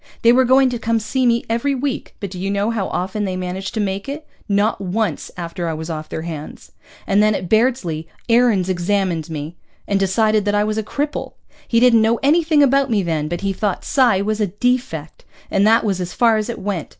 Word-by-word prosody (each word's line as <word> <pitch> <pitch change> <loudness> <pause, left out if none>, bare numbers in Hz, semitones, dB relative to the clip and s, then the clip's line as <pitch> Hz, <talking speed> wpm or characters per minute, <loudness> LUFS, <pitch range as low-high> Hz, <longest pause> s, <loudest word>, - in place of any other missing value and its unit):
They 230 - +7
were 260 +1 +4
going 260 +1 +4
to 240 - -3
come 230 0 0
see 255 +4 0
me 235 0 +2
every 235 +5 0
week, 270 +1 -4
but 200 -3 -5
do 185 - -7
you 195 +2 -2
know 200 +3 0
how 210 -5 -2
often 190 +4 -3
they 190 -2 -2
managed 185 +2 -4
to - - -1
make 200 +3 -2
it? 300 +2 -6 0.2
Not 205 +1 +1
once 200 +3 -2
after 170 0 -4
I 160 - -2
was 160 +2 -5
off 155 -1 -6
their 160 - -5
hands. 155 -3 -8 0.3
And 200 +1 +3
then 215 0 +3
at 180 - -4
Bairdsley 215 -8 +1 0.2
Aarons 230 -6 +3
examined 180 -3 -1
me 155 +2 -6 0.3
and 200 -1 +1
decided 215 +2 +2
that 205 0 +1
I 205 - +3
was 215 +1 -1
a - - 0
cripple. 290 +7 -3 0.3
He 230 - +3
didn't 235 -2 +5
know 225 +1 +2
anything 310 0 +4
about 275 0 +3
me 210 -4 +1
then, 160 -3 -1
but 175 +2 -4
he 195 -1 -1
thought 200 0 -2
psi 240 -8 +3
was 215 +1 -1
a 210 - +2
defect. 205 - -2 0.3
And 200 +2 +3
that 225 +1 +4
was 195 -4 -1
as 180 0 -5
far 230 -2 +3
as 215 +2 -2
it 235 - -4
went. 190 -6 -4
205 Hz, 225 wpm, -19 LUFS, 185-235 Hz, 0.3 s, They